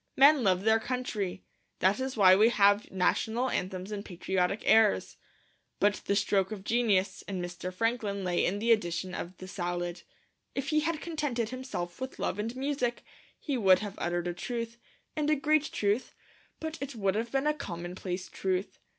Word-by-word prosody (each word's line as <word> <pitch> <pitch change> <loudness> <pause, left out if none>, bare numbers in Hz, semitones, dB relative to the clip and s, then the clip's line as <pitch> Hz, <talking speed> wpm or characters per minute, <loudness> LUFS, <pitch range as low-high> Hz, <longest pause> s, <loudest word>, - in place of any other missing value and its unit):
Men 280 +1 +7
love 190 -2 +2
their 220 +1 +4
country; 215 -6 -3 0.3
that 195 +4 +2
is 260 -1 -3
why 185 -2 +8
we 215 +4 +6
have 205 -2 +4
national 225 +6 +1
anthems 185 +2 -3
and 205 -1 -4
patriotic 185 +1 -1
airs. 220 - +4 0.6
But 205 0 +2
the 200 - +1
stroke 200 -1 +1
of 205 -3 -6
genius 205 -5 +1
in 195 -2 -3
Mr. 175 +1 -5
Franklin 210 -1 -1
lay 180 -1 +1
in 195 - +1
the 230 +3 +1
addition 180 -4 +1
of 175 +1 -6
the 185 - -9
Salad. 175 -2 -3 0.5
If 275 +1 -2
he 305 - +3
had 320 0 -1
contented 290 -9 -2
himself 250 -9 -5
with 260 0 -5
Love 200 - -2
and 225 +3 -3
Music, 260 -3 -1 0.3
he 280 -5 -2
would 190 -3 +6
have 200 - -6
uttered 175 0 -1
a 175 - -1
truth, 230 +5 -5 0.4
and 300 -1 0
a 305 - +4
great 305 +1 +1
truth; 205 +4 0 0.4
but 320 0 -5
it 275 -2 -5
would 195 -3 +1
have 230 +3 -2
been 270 +1 0
a 300 - +3
commonplace 180 - -5
truth. 190 +1 -2
205 Hz, 175 wpm, -30 LUFS, 185-250 Hz, 0.6 s, why